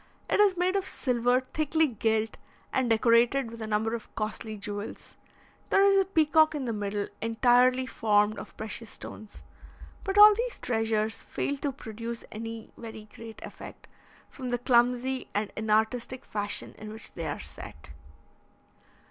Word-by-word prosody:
It -, -, +1 dB
is 400 Hz, -3 st, +5 dB
made 365 Hz, +2 st, +1 dB
of 385 Hz, -1 st, 0 dB
silver 245 Hz, 0 st, +1 dB
thickly 315 Hz, +1 st, +2 dB
gilt, 220 Hz, -3 st, 0 dB, 0.4 s
and 255 Hz, -2 st, +1 dB
decorated 235 Hz, +2 st, +3 dB
with 230 Hz, -1 st, -9 dB
a 220 Hz, -, -4 dB
number 220 Hz, +1 st, 0 dB
of 230 Hz, -2 st, -7 dB
costly 215 Hz, 0 st, -4 dB
jewels; 205 Hz, +1 st, -6 dB, 0.5 s
there 390 Hz, -, +5 dB
is 395 Hz, 0 st, +5 dB
a -, -, 0 dB
peacock 315 Hz, -3 st, +4 dB
in 280 Hz, -3 st, -3 dB
the 230 Hz, -, -1 dB
middle 205 Hz, -1 st, -2 dB
entirely 245 Hz, +3 st, +4 dB
formed 210 Hz, -3 st, +2 dB
of -, -, -11 dB
precious 220 Hz, +1 st, -6 dB
stones; 215 Hz, 0 st, -9 dB, 0.6 s
but 390 Hz, 0 st, -2 dB
all 420 Hz, 0 st, +11 dB
these 475 Hz, +3 st, -3 dB
treasures 220 Hz, -2 st, -1 dB
fail 285 Hz, -, -2 dB
to 280 Hz, +1 st, -2 dB
produce 230 Hz, -2 st, -7 dB
any 225 Hz, +1 st, -7 dB
very 220 Hz, -2 st, -9 dB
great 225 Hz, -1 st, -10 dB
effect, -, -, -10 dB, 0.4 s
from 255 Hz, -3 st, -7 dB
the 245 Hz, -, +1 dB
clumsy 250 Hz, +1 st, +2 dB
and 205 Hz, 0 st, -1 dB
inartistic 220 Hz, +4 st, 0 dB
fashion 205 Hz, -1 st, -3 dB
in 215 Hz, 0 st, -8 dB
which 220 Hz, +1 st, -9 dB
they 165 Hz, -2 st, -4 dB
are 145 Hz, -, -3 dB
set. 75 Hz, -1 st, -9 dB
230 Hz, 155 wpm, -28 LUFS, 215-265 Hz, 0.6 s, all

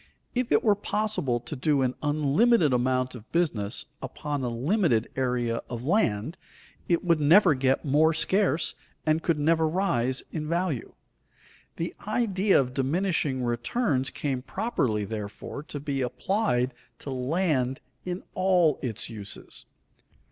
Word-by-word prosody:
If 250 Hz, -1 st, -1 dB
it -, -, +4 dB
were 215 Hz, -, +5 dB
possible 205 Hz, -, -1 dB
to 150 Hz, -, -6 dB
do 140 Hz, 0 st, +2 dB
an 125 Hz, -1 st, +1 dB
unlimited 150 Hz, -, +3 dB
amount 130 Hz, +1 st, +1 dB
of 120 Hz, -2 st, -12 dB
business 125 Hz, -11 st, 0 dB, 0.2 s
upon 145 Hz, -2 st, -4 dB
a 125 Hz, -, 0 dB
limited 125 Hz, -, +1 dB
area 125 Hz, -3 st, 0 dB
of 120 Hz, 0 st, -5 dB
land, 155 Hz, -, +1 dB, 0.5 s
it 170 Hz, -1 st, +2 dB
would 170 Hz, -2 st, +3 dB
never 170 Hz, +3 st, +6 dB
get 135 Hz, +2 st, +1 dB
more 150 Hz, +3 st, +4 dB
scarce 165 Hz, 0 st, +2 dB, 0.3 s
and 155 Hz, +1 st, +2 dB
could 165 Hz, -2 st, +1 dB
never 160 Hz, +2 st, +2 dB
rise 130 Hz, -8 st, 0 dB
in 155 Hz, -2 st, -4 dB
value. 170 Hz, -7 st, -2 dB, 0.8 s
The 170 Hz, -, -3 dB
idea 210 Hz, -3 st, +2 dB
of 125 Hz, -2 st, -1 dB
diminishing 140 Hz, -1 st, 0 dB
returns 130 Hz, -, 0 dB
came 135 Hz, -4 st, -3 dB
properly, 125 Hz, -, -1 dB
therefore, 105 Hz, +5 st, -6 dB
to 145 Hz, -, -5 dB
be 140 Hz, -1 st, -2 dB
applied 125 Hz, -, 0 dB, 0.2 s
to 140 Hz, -, -6 dB
land 130 Hz, -1 st, 0 dB, 0.2 s
in 180 Hz, +1 st, -4 dB
all 180 Hz, -4 st, +3 dB
its 115 Hz, -6 st, -4 dB
uses. 105 Hz, -4 st, -9 dB
145 Hz, 135 wpm, -27 LUFS, 125-175 Hz, 0.8 s, never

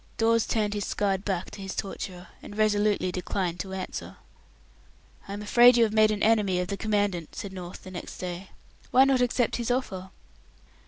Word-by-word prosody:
Dawes 230 Hz, 0 st, +3 dB
turned 210 Hz, -2 st, 0 dB
his 205 Hz, -2 st, -2 dB
scarred 195 Hz, -2 st, 0 dB
back 190 Hz, -4 st, -2 dB
to 200 Hz, -, -9 dB
his 195 Hz, 0 st, -5 dB
torturer, 185 Hz, -2 st, -5 dB
and 205 Hz, -, -10 dB
resolutely 210 Hz, -3 st, +2 dB
declined 180 Hz, -1 st, -2 dB
to 190 Hz, -, -5 dB
answer. 190 Hz, -1 st, -6 dB, 1.1 s
"I 200 Hz, -, -5 dB
am 205 Hz, +1 st, -5 dB
afraid 240 Hz, +3 st, +7 dB
you 235 Hz, -, +6 dB
have 215 Hz, -2 st, +1 dB
made 215 Hz, 0 st, +5 dB
an 210 Hz, -1 st, -1 dB
enemy 210 Hz, -5 st, +3 dB
of 180 Hz, -, -2 dB
the 200 Hz, -, -1 dB
Commandant," 205 Hz, -6 st, -1 dB
said 200 Hz, -3 st, -6 dB
North, 180 Hz, -1 st, -8 dB
the 185 Hz, -, -9 dB
next 175 Hz, -, -7 dB
day. 180 Hz, +1 st, -6 dB, 0.4 s
"Why 260 Hz, -, +6 dB
not 270 Hz, -2 st, +3 dB
accept 245 Hz, -1 st, +1 dB
his 235 Hz, -1 st, -3 dB
offer?" 195 Hz, -7 st, -2 dB
205 Hz, 190 wpm, -27 LUFS, 185-220 Hz, 1.1 s, afraid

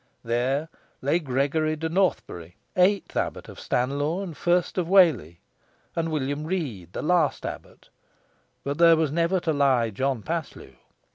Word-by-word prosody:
There 125 Hz, +6 st, 0 dB, 0.4 s
lay 145 Hz, +6 st, +2 dB
Gregory 150 Hz, +2 st, 0 dB
de 160 Hz, +1 st, -3 dB
Northbury, 160 Hz, -, -1 dB, 0.2 s
eighth 190 Hz, +2 st, +2 dB
abbot -, -, -2 dB
of -, -, -11 dB
Stanlaw 145 Hz, +8 st, -1 dB
and 170 Hz, -5 st, -7 dB
first 175 Hz, +3 st, +1 dB
of 175 Hz, -, -1 dB
Whalley, 145 Hz, -, +4 dB, 0.5 s
and 165 Hz, -1 st, -1 dB
William 145 Hz, -1 st, -2 dB
Rede, 145 Hz, -, -4 dB
the -, -, -4 dB
last 165 Hz, -3 st, +1 dB
abbot; -, -, -9 dB, 0.7 s
but 140 Hz, +3 st, -3 dB
there 165 Hz, -1 st, +7 dB
was 160 Hz, -3 st, 0 dB
never 170 Hz, +4 st, +1 dB
to 160 Hz, -, 0 dB
lie 130 Hz, -5 st, +2 dB
John 130 Hz, +1 st, -2 dB
Paslew. 160 Hz, -, -5 dB
155 Hz, 145 wpm, -25 LUFS, 130-170 Hz, 0.7 s, there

